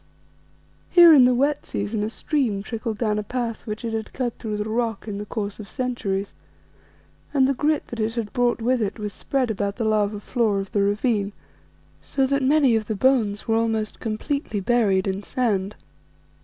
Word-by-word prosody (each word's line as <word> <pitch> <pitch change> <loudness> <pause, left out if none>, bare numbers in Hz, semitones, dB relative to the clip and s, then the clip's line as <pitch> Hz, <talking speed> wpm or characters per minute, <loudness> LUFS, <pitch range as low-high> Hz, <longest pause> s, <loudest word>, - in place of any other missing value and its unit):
Here 345 -2 +8
in 265 -4 +8
the 250 0 +4
wet 280 +4 +1
season 205 +1 -2
a 210 - -1
stream 235 -6 -1
trickled 225 -1 -4
down 215 -2 0
a - - -3
path 235 0 -4
which 215 +2 -4
it 225 - -3
had 220 -1 -4
cut 245 -3 -2
through 215 -2 -3
the 210 +1 -3
rock 225 -1 -2
in 200 -1 -4
the 210 - -6
course 205 -2 -4
of 205 - -9
centuries, 225 -7 -2 1.0
and 265 -2 +5
the 275 - +2
grit 300 +3 0
that 235 - -6
it 220 +1 -1
had 225 -3 -3
brought 245 -2 +1
with 250 +1 +2
it 205 +1 -2
was 210 -2 -4
spread 260 +1 -1
about 200 -1 -2
the 230 - -2
lava 210 -1 +1
floor 215 -2 0
of 195 0 -6
the 205 - +1
ravine, 205 0 0 0.7
so 270 - 0
that 275 +1 +1
many 270 -2 +4
of 215 -1 -1
the 220 - -2
bones 215 -3 +1
were 225 - +2
almost 225 -2 -1
completely 225 +1 -2
buried 200 -3 +2
in 195 +1 -2
the - - -14
sand. 210 -5 -1
225 Hz, 195 wpm, -23 LUFS, 205-250 Hz, 1.0 s, Here